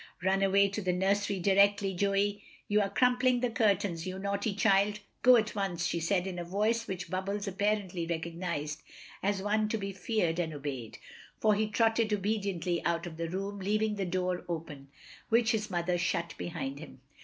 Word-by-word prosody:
"Run 190 +1 +2
away 195 +1 +4
to 200 +2 -4
the 185 -2 0
nursery 200 +2 +1
directly, 200 +1 +3
Joey. 200 +2 +1 0.3
You 210 +1 +3
are 200 - 0
crumpling 250 +3 +3
the 250 -2 0
curtains, 200 -6 +1
you 185 0 -4
naughty 200 +1 -2
child. 200 0 +3 0.2
Go 250 0 +8
at 220 -2 +1
once," 190 -4 -2
she 170 - 0
said, 180 +2 +1
in 185 -2 -4
a - - -3
voice 215 +6 0
which 180 -2 -5
Bubbles 200 +2 -2
apparently 195 -3 -1
recognised 165 -2 -3 0.4
as 195 -1 0
one 215 +1 +1
to 225 - 0
be 195 -1 -4
feared 180 -3 -1
and 160 -3 -2
obeyed, 135 -6 -5 0.4
for 215 -1 +4
he 215 +1 +1
trotted 225 0 +2
obediently 195 -4 -1
out 170 0 0
of 165 -2 -8
the 165 0 -3
room, 195 +3 -4
leaving 215 +2 0
the 200 -2 -2
door 180 0 -1
open, 155 -5 -5 0.4
which 230 -1 +4
his 215 -2 -1
mother 175 -1 0
shut 170 -1 -1
behind 140 -5 -5
him. 145 -4 -11
195 Hz, 180 wpm, -30 LUFS, 175-210 Hz, 0.4 s, Go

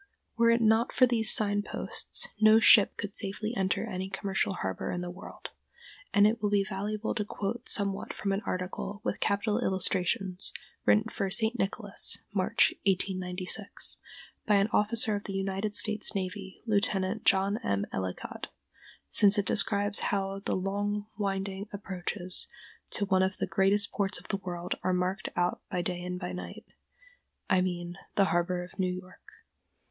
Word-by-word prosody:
Were 230 0 +4
it 230 0 +3
not 225 +2 +3
for 255 - +5
these 230 -3 +4
sign 205 -1 +4
posts - - 0
no 215 0 +7
ship 210 -2 +6
could 205 -1 -5
safely 215 +2 -2
enter 190 -3 0
any 185 +1 -4
commercial 195 0 -1
harbor 95 - -4
in 175 - -3
the 175 0 -5
world; 180 - -10 0.6
and 205 0 +5
it 220 +2 +2
will 210 - +1
be 200 -1 +2
valuable 210 +2 -3
to 215 - -1
quote 205 +2 -5
somewhat 200 -2 +1
from 200 - -3
an 195 +1 -1
article, 185 +3 -4
with - - -2
capital 205 +2 0
illustrations, 190 -2 0 0.3
written 215 - +5
for 210 -3 -3
"St. 220 +4 +2
Nicholas" 200 +1 +2 0.2
(March, 200 +4 +3 0.2
1896) 185 +1 0 0.5
by 210 - +4
an 200 +2 +3
officer 215 +1 +3
of 205 - -5
the 195 - -5
United 195 +2 -2
States 215 0 0
Navy, 190 0 -5
Lieut. 210 -2 +2 0.4
John 195 +2 +2
M. 100 0 0
Ellicott, 95 -1 -5 0.6
since 200 - +5
it 205 - +1
describes 205 0 +4
how 195 -1 -1
the - - 0
long, 205 +2 -2
winding 195 0 -3
approaches 185 -1 -4 0.4
to 200 - 0
one 190 -1 +2
of 190 +1 0
the - - -1
greatest 200 +1 +2
ports 200 0 -1
of - - -16
the 200 - 0
world 180 -2 -4
are 185 - 0
marked 185 +2 -1
out 175 0 0
by 180 -3 -2
day 175 0 -2
and 180 0 -4
by 180 -1 -5
night—I 360 - -6
mean 175 0 -4 0.2
the 200 - +4
harbor 175 +1 0
of 185 +2 -14
New 185 -1 +1
York. 180 0 -9
195 Hz, 165 wpm, -29 LUFS, 185-210 Hz, 0.6 s, no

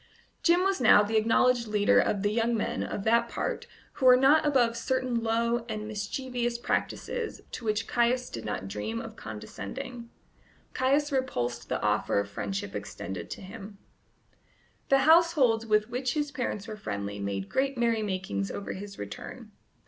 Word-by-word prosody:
Jim 345 +1 +4
was 385 -6 +1
now 220 -3 +7
the 215 +2 -2
acknowledged 235 +2 +3
leader 210 -1 +4
of 200 -1 +1
the 205 - +2
young 230 +1 +1
men 215 - -2
of 200 - -3
that 235 +2 +3
part - - -3 0.3
who 260 - +1
were 250 0 +9
not 275 +4 +5
above 250 -6 +3
certain 255 0 -1
low 230 +1 +1
and 215 -1 -4
mischievous 240 +3 -3
practices 455 - -2
to - - -7
which 215 0 0
Caius 245 +1 +1
did 115 - -6
not 105 -2 -4
dream 105 +3 -4
of - - -8
condescending. 110 - -7 0.6
Caius 280 +3 +2
repulsed 120 - -2
the - - 0
offer 105 -1 +2
of 100 - -2
friendship 100 -1 -4
extended 100 -2 -6
to - - -7
him. 200 +1 -10 1.1
The 275 0 +4
households 305 -9 +5
with 215 +1 +2
which 250 +2 -1
his 295 -1 -1
parents 235 -6 -3
were 215 - -5
friendly 100 - -4
made 100 -1 -3
great 270 0 0
merrymakings 195 - -1
over 200 - -5
his 200 +1 -8
return. 100 0 -8
225 Hz, 160 wpm, -28 LUFS, 185-255 Hz, 1.1 s, were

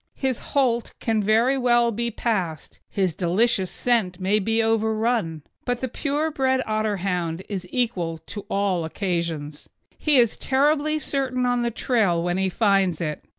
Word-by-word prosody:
His 260 -3 -1 0.2
holt 240 -4 +1
can 225 -2 0
very 230 +6 +3
well 240 -1 +3
be 235 +2 -2
passed, 190 -9 -3
his 190 -4 0
delicious 190 +3 +1
scent 205 -5 0
may 195 +3 +2
be 225 +3 +1
overrun; 220 -6 0 0.2
but 245 -1 -1
the 260 - -2
pure 295 +5 -1
bred 260 -2 +1
Otterhound 190 -5 -1
is 190 -3 -5
equal 185 -10 -1
to 200 +5 -8
all 195 -4 0
occasions. 165 -4 -3 0.3
He 300 -3 +4
is 235 -3 +4
terribly 295 +3 +2
certain 265 -4 -1
on 245 0 +1
the 235 - +1
trail 220 -7 +1
when 175 +1 0
he 190 0 +1
finds 195 -4 +2
it. 155 -3 -3
220 Hz, 150 wpm, -24 LUFS, 180-245 Hz, 0.3 s, He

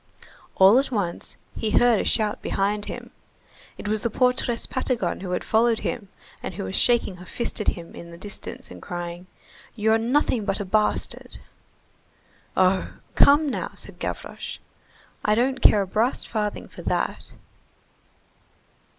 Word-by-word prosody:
All 195 +6 +7
at 275 - -1
once, 200 -8 -2 0.2
he 220 - -1
heard 235 0 +5
a - - -1
shout 215 -2 0
behind 205 +1 0
him; - - -7 0.7
it - - -6
was 215 0 0
the 235 - 0
portress 250 0 +1
Patagon 250 -8 -1
who 190 - -5
had 180 - -1
followed 225 0 +3
him, 205 -5 -3 0.3
and - - -5
who - - -4
was 95 0 -4
shaking 235 -6 +3
her 180 - -11
fist 235 +4 -3
at - - -4
him 170 -1 -2
in 170 - -9
the 170 - -10
distance 205 +3 -7
and - - -10
crying:— 175 0 -6 0.5
"You're 220 0 +3
nothing 245 -1 +1
but 195 -1 -1
a 205 - -3
bastard." 210 +3 0 1.2
"Oh! 185 0 +3 0.2
Come 295 +2 +6
now," 270 - -3
said - - -9
Gavroche, - - -5 0.7
"I 210 - +3
don't 260 +3 +1
care 205 -2 +6
a - - -7
brass 225 +7 +1
farthing 210 -2 -3
for - - -11
that!" - - -2
210 Hz, 155 wpm, -25 LUFS, 190-240 Hz, 1.2 s, All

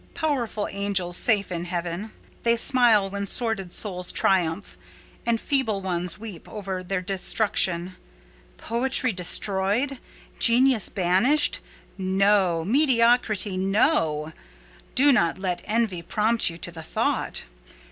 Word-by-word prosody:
Powerful 245 -9 -2
angels, 195 -3 0
safe 200 -2 +2
in 170 -1 -4
heaven! 175 +3 -4 0.3
they 235 0 +2
smile 230 -5 +3
when 200 +1 -4
sordid 220 -5 0
souls 180 -3 -1
triumph, 165 - 0 0.5
and 230 -1 +1
feeble 245 -8 0
ones 180 -2 -1
weep 210 -5 -10
over 195 -3 -5
their 185 +1 -3
destruction. 185 -2 +1 0.6
Poetry 255 +2 0
destroyed? 200 +8 +1 0.4
Genius 245 -1 +4
banished? 195 +12 +2 0.4
No! 190 -3 +1
Mediocrity, 230 - +2
no: 185 - +1 0.6
do 285 +2 +6
not 170 -10 +1
let 185 -2 -3
envy 215 -5 -1
prompt 220 +6 0
you 165 - -8
to 175 - -5
the 165 -1 -9
thought. 160 - -2
200 Hz, 115 wpm, -24 LUFS, 180-230 Hz, 0.6 s, do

